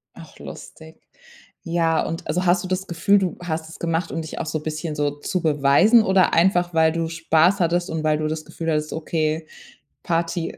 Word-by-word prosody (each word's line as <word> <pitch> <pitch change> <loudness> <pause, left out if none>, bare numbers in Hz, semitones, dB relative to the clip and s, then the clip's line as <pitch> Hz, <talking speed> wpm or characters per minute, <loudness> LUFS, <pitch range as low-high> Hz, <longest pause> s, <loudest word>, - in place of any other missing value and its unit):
Ach, - - -14
lustig. 160 0 -11 0.6
Ja, 165 -1 +1
und 165 +1 -5
also 180 +2 -1
hast 175 +1 +3
du 185 - -5
das 185 +1 -3
Gefühl, 190 +4 +2
du 185 -3 -2
hast 160 -1 -4
es - - -12
gemacht, 165 0 -2
um 165 - -3
dich 160 - -7
auch 165 - -3
so 155 0 -3
bisschen 155 0 -4
so 145 -1 0
zu 180 +3 -2
beweisen 155 - +4
oder 190 -2 +3
einfach, 175 0 +2
weil 160 -1 +4
du 165 0 -2
Spaß 165 +3 +2
hattest 175 +1 0
und 160 -1 -3
weil 155 -1 +2
du 155 - -2
das 155 0 -4
Gefühl 165 +1 -4
hattest: 150 0 -1
„Okay, 155 0 -2 0.6
Party.“ 170 0 -2
165 Hz, 200 wpm, -22 LUFS, 155-175 Hz, 0.6 s, beweisen